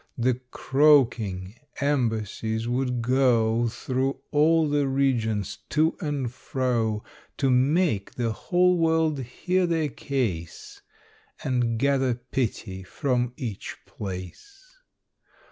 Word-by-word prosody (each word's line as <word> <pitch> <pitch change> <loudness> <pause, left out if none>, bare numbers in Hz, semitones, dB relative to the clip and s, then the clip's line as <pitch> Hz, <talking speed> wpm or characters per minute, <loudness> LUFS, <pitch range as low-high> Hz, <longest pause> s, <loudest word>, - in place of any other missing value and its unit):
The 125 +1 +1
croaking 120 -10 +2 0.2
embassies 115 -5 -1
would 125 -1 -1
go 120 -2 +3
Through 130 +3 -2
all 160 +2 +4
the 145 -1 +1
regions, 110 -7 0
to 160 +2 +2
and 145 -6 -2
fro, 120 -5 -1 0.3
To 135 -2 +2
make 135 - +2
the 120 -2 -1
whole 180 +8 +2
world 160 -2 +2
hear 180 +9 -1
their 160 -3 0
case, 110 -13 -4 0.6
And 120 -3 0
gather 135 -1 +2
pity 120 -6 -3
from 125 +4 -1
each 110 -6 -5
place. 105 - -9
125 Hz, 100 wpm, -26 LUFS, 115-145 Hz, 0.6 s, all